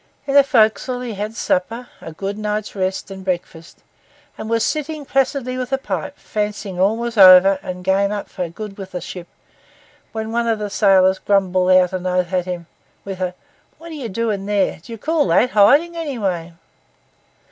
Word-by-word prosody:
In 275 - -2
the 280 0 +7
forecastle 245 0 +2
he 245 -3 -5
had 210 +2 -5
supper, 230 +5 -1
a 160 - -8
good 195 +5 -5
night's 210 0 -3
rest, 190 0 -3
and 190 0 -8
breakfast; 175 -3 -5 0.5
and 220 - -7
was 230 0 +1
sitting 305 -1 -3
placidly 265 -1 -1
with 255 0 -4
a 270 - +2
pipe, 190 -11 -5
fancying 210 -3 -4
all 200 +4 +2
was 235 -2 -3
over 190 +1 +8
and 185 -1 -6
the 180 - -12
game 195 +2 +2
up 205 -1 -4
for 175 -2 -5
good 205 +3 -9
with 190 -1 -9
that 180 -2 -4
ship, 180 -2 -8 0.8
when 220 0 -4
one 235 0 0
of 225 -1 +1
the 210 -1 -5
sailors 190 -2 +4
grumbled 185 -2 +1
out 185 0 +4
an 185 0 -3
oath 180 0 -1
at 180 -1 +1
him, 180 -2 -5 0.4
with 190 -1 -6
a 180 -1 -2 0.4
'What 335 +1 -11
are - - -7
you 270 -7 -5
doing 205 -1 -2
there?' 205 -2 +1
and - - -16
'Do 205 - -13
you 230 - -6
call 310 +4 0
that 215 +9 +3
hiding, 285 +12 +4
anyway? 200 - -3
205 Hz, 195 wpm, -19 LUFS, 185-235 Hz, 0.8 s, over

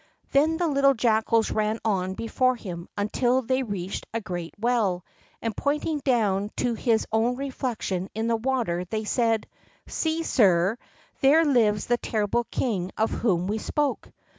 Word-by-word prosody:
Then 310 +4 +3
the 350 0 +1
little 275 -2 +3
jackals 225 -1 +2
ran 215 0 0
on 190 -3 0
before 255 +4 +1
him 175 -6 -7
until 245 +5 +1
they 260 +3 +1
reached 200 -6 -4
a 230 - -1
great 175 -5 -6
well, 210 -6 +1 0.4
and, 225 -3 -2
pointing 295 +2 -1
down 210 -7 +1
to 245 -1 +1
his 225 -1 +1
own 225 +3 +2
reflection 245 -8 -3
in 220 +1 -1
the 230 0 +2
water, 225 -7 -1
they 215 +4 -3
said: 225 0 +1 0.4
"See, 320 0 -1
sire, 195 - +3 0.4
there 305 +5 +5
lives 220 -7 +3
the 240 - +2
terrible 220 +1 -1
king 190 -7 -1
of 220 - +1
whom 180 -7 +1
we 210 +3 -1
spoke." 290 +4 -1
225 Hz, 155 wpm, -26 LUFS, 205-260 Hz, 0.4 s, there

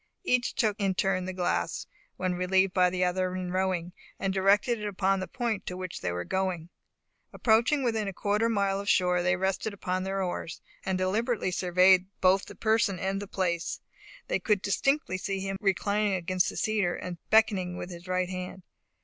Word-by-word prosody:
Each 250 -8 +1
took 215 -2 +1
in 195 -2 +1
turn 185 -1 0
the 185 - -3
glass, 180 -1 -1 0.3
when 185 0 -1
relieved 185 +1 +2
by 180 -1 +4
the 180 0 -1
other 185 0 -1
in 180 -1 -4
rowing, 185 -2 -1 0.2
and 195 -1 -1
directed 200 +5 +3
it 210 - -3
upon 195 -1 +1
the 185 - -4
point 235 -5 -3
to 180 - -4
which 185 -2 -6
they - - -1
were 90 0 -3
going. 185 -3 -2 0.6
Approaching 240 +5 +2
within 225 -4 0
a - - -2
quarter 210 +4 +1
of - - 0
a - - -1
mile 200 -1 +1
of 200 - -3
shore, 180 -1 +3
they 180 +1 +2
rested 190 +3 -1
upon 185 -1 -2
their 195 +1 -2
oars, 175 -2 -4 0.2
and 190 -1 -1
deliberately 210 +3 0
surveyed 185 +1 +4
both 190 +1 +4
the - - -10
person 220 -3 +1
and 195 +2 -2
the 205 - -6
place. 175 -3 -2 0.5
They - - 0
could 210 -3 +1
distinctly 240 -2 +1
see 195 0 -2
him 195 0 -3
reclining 205 +1 +1
against 185 +1 0
the - - -7
cedar, 210 -5 +1
and 175 -2 -6
beckoning 200 -5 +3
with 180 - -6
his 175 +1 -10
right 185 0 0
hand. 185 0 -6
190 Hz, 195 wpm, -28 LUFS, 180-205 Hz, 0.6 s, by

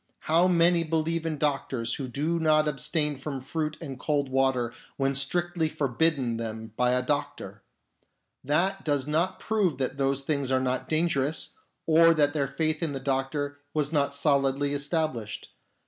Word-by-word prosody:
How 170 +3 +3
many 170 -1 +4
believe 165 +1 -1
in 155 -2 -2
doctors 135 -5 -1
who 135 - -4
do 155 +7 -1
not 155 -1 +3
abstain 150 0 0
from 140 0 -5
fruit 155 +3 -3
and 135 -6 -7
cold 145 -2 0
water 130 -3 +1 0.2
when 135 0 +1
strictly 165 +4 0
forbidden 140 -4 0
them 110 -1 -6
by 125 +1 +2
a 125 0 +1
doctor! 145 +2 -3 0.8
That 185 +8 +1
does 145 -3 0
not 160 +5 0
prove 200 -10 0
that 135 +1 -3
those 135 0 +1
things 140 -2 -1
are 130 0 +2
not 130 0 -1
dangerous, 155 -2 +1 0.4
or 165 +1 +6
that 145 -2 +3
their 140 -3 0
faith 155 +3 -1
in 160 -4 -1
the 135 - -3
doctor 140 +2 -2 0.2
was 150 0 0
not 140 -1 +1
solidly 140 -1 +2
established. 145 -6 -2
145 Hz, 160 wpm, -27 LUFS, 135-160 Hz, 0.8 s, or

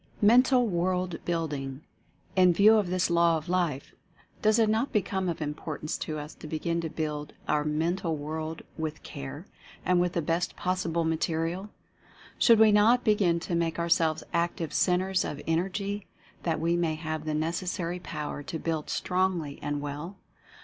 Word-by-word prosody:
MENTAL 245 +3 +5
WORLD 180 -2 -1
BUILDING. 145 -5 -2 0.5
In 185 -2 +6
view 205 +5 +6
of 200 -4 +1
this 180 -1 +1
law 170 -1 +4
of 155 - -8
life, 170 -6 -1 0.5
does 215 +1 +4
it 225 -1 +4
not 220 +5 +1
become 190 -2 0
of 165 -2 -3
im 150 0 -2
portance 155 0 -5
to 155 - -3
us 150 +1 -7
to - - -10
begin 165 +2 -1
to 165 - -3
build 150 -2 -4
our 150 0 +2
mental 160 +3 0
world 155 +2 -5 0.2
with 155 -1 -4
care, 140 +4 -7 0.4
and 180 -1 +3
with 180 0 0
the 170 - 0
best 170 +3 -1
possible 180 -2 -1
material? 165 +4 -1 0.7
Should 230 -2 +6
we 220 0 +7
not 220 +4 +5
begin 200 -6 +3
to 175 - -4
make 170 -1 0
ourselves 165 -2 +2
active 170 -2 -1
Centres 185 +1 +2
of 145 - -4
En 165 0 +2
ergy, 200 +2 -3 0.3
that 165 -2 -1
we 170 +2 +1
may 170 -2 0
have 155 -1 -4
the 155 -1 -1
necessary 170 +2 -2
Power 150 -4 -5
to 160 - -5
build 160 -1 -3
strongly 180 -6 -1
and 145 0 -2
well? 145 +6 -5
170 Hz, 170 wpm, -28 LUFS, 155-185 Hz, 0.7 s, we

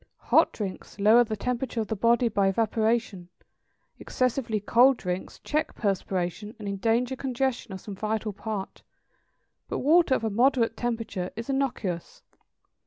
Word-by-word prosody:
Hot - - +6
drinks 200 -2 -6
lower 215 +4 +6
the 220 -2 -4
temperature 250 +1 -2
of 220 - -1
the 220 - -2
body 235 +3 +3
by 200 -3 +1
evaporation; 220 -2 0 0.7
excessively 250 -3 -1
cold 245 +5 +4
drinks 180 0 -4
check 305 +1 -1
perspiration, 195 0 -2
and 210 -3 -7
endanger 230 +6 0
congestion 260 -3 -2
of 190 - -6
some 205 - -7
vital 215 +1 -2
part; 200 -1 -5 0.9
but - - -3
water 310 0 +4
of - - -3
a 220 - 0
moderate 240 +2 +2
temperature 225 -6 -3
is 230 +4 -4
innocuous. 235 -11 -3
225 Hz, 140 wpm, -27 LUFS, 200-245 Hz, 0.9 s, Hot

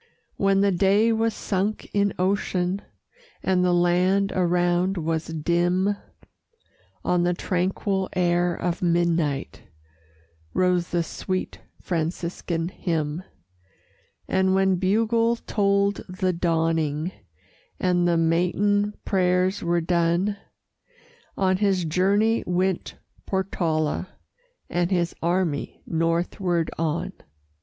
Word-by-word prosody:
When 195 0 +2
the 200 0 +3
day 200 +5 +3
was 225 0 +1
sunk 200 +2 -2
in 200 0 +2
ocean, 185 0 0 0.6
And 185 -1 +2
the 180 - +3
land 180 +3 +2
around 180 +1 +1
was 160 -1 -2
dim, 175 +5 +1 1.1
On 180 -1 +2
the 175 0 +1
tranquil 190 +2 -1
air 175 -1 +1
of 175 -1 -2
midnight 170 -5 0 0.9
Rose 180 -1 +2
the 175 -1 0
sweet 185 +3 -4 0.2
Franciscan 170 0 -2
hymn; 160 -4 -2 1.1
And 190 0 +2
when 190 -1 +3
bugle 225 +5 +2
told 200 -2 +1
the 185 0 -1
dawning, 165 -1 0 0.7
And 175 -1 +2
the 170 -1 +2
matin 200 +5 +1
prayers 185 0 +1
were 170 0 +1
done, 175 +4 +1 1.0
On 190 -1 +2
his 190 -3 +1
journey 200 +7 +2
went 180 +1 -1 0.3
Portala, 170 -4 -1 0.6
And 175 0 0
his 175 -3 0
army 170 -3 -1
northward 170 +1 0
on. 165 0 -1
180 Hz, 100 wpm, -24 LUFS, 170-195 Hz, 1.1 s, the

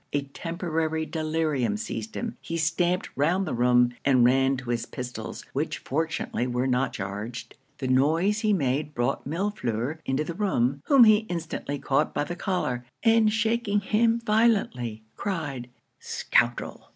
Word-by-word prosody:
A 145 -1 +1
temporary 160 +1 -2
delirium 155 - -1
seized 220 0 -5
him; 235 -1 -3
he 165 - -4
stamped 175 +3 0
round 175 +7 +2
the 155 - -3
room, 125 0 +3
and 130 -3 +4
ran 135 +2 +3
to 130 -2 -4
his 115 -1 -2
pistols, 125 -1 -6
which - - -1
fortunately 160 -4 -2
were 125 +1 -1
not 130 +1 +1
charged. 105 +4 -6 0.2
The 130 - -3
noise 160 +11 +2
he 215 -1 +1
made 145 -4 0
brought 120 +2 -1
Millefleur 155 - -2
into 135 +3 0
the 170 - -5
room, 140 - 0
whom 275 -4 +7
he 215 0 +5
instantly 160 -4 -3
caught 140 +2 0
by - - +1
the 175 +4 -5
collar, 175 - -2 0.2
and 225 -1 +5
shaking 220 -1 +1
him 225 +3 +2
violently, 210 - +1
cried 145 -10 -3 0.3
'Scoundrel! 120 0 0
155 Hz, 150 wpm, -26 LUFS, 125-195 Hz, 0.3 s, whom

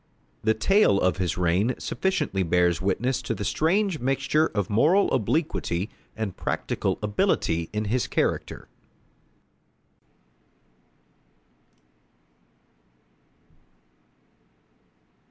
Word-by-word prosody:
The 110 0 +2
tale 195 - +3
of 90 -2 +1
his 90 -3 -1
reign 90 +8 +1
sufficiently 130 - -1
bears 90 0 +2
witness 120 +7 0
to 115 - -3
the 105 - -5
strange 175 - +1
mixture 135 +4 +1
of 100 -4 -2
moral 155 - +3
obliquity 110 - -1 0.3
and 110 -4 -3
practical - - -2
ability 85 -5 0
in 105 0 -2
his 120 +4 0
character. - - -2
110 Hz, 80 wpm, -25 LUFS, 95-140 Hz, 0.3 s, tale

